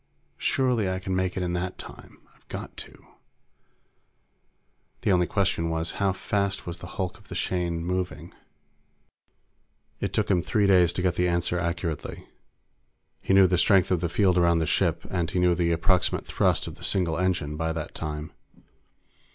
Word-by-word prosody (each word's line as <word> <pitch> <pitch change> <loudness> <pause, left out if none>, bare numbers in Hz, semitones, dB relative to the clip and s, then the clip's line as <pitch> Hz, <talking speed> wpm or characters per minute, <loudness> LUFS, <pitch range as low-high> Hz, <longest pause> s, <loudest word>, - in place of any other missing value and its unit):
Surely 125 -7 +1
I 95 - -1
can 95 0 -3
make 95 0 -1
it 95 - -1
in 90 -1 -2
that 90 +1 -3
time. - - -11 0.2
I've - - -30
got - - -7
to._ - - -7 2.0
The - - +2
only 90 -2 +3
question 95 -5 0
was, 80 0 -1
how 100 -1 +3
fast 100 +1 -1
was 85 0 -6
the 85 - -8
hulk 95 -3 -3
of - - -21
the - - -7
Shane 85 -2 -1
moving? 90 0 -3 1.7
It - - -2
took - - 0
him 90 - +3
three 105 +4 +1
days 90 -3 +5
to 90 - -2
get 90 -2 +2
the 90 - +1
answer 85 0 0
accurately. 85 -2 -3 1.0
He 95 - +2
knew 95 -1 +8
the 90 -1 +2
strength 95 -2 +4
of 90 - +3
the 85 - 0
field 90 0 +3
around 85 -1 +4
the 80 - +1
ship, - - +1
and 85 -3 -1
he 90 - -3
knew 90 -1 +4
the 85 0 +1
approximate 85 +2 +1
thrust - - +1
of - - -8
the - - -13
single 85 -4 0
engine 90 -5 0
by 80 +1 -1
that 80 0 -5
time. 75 -1 -5
90 Hz, 175 wpm, -26 LUFS, 85-95 Hz, 2.0 s, knew